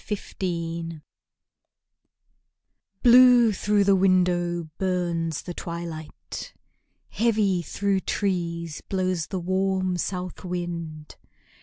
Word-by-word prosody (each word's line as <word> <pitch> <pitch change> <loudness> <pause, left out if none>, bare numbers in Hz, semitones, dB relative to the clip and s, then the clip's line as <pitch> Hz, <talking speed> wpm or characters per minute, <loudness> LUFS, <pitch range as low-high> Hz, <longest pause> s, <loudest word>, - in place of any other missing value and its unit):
March 210 -2 -5
Evening 165 -3 -3 2.0
Blue 245 -1 +7
through 205 +1 +2
the 200 0 +4
window 175 -3 +2
burns 170 -4 -1
the 175 - -6
twilight; 170 -2 -7 0.5
Heavy, 210 -5 +1
through 200 +3 -1
trees, 170 -5 -2
blows 185 -4 -1
the 190 - -3
warm 185 0 0
south 180 0 -4
wind. 170 -4 -5
180 Hz, 90 wpm, -25 LUFS, 170-195 Hz, 2.0 s, Blue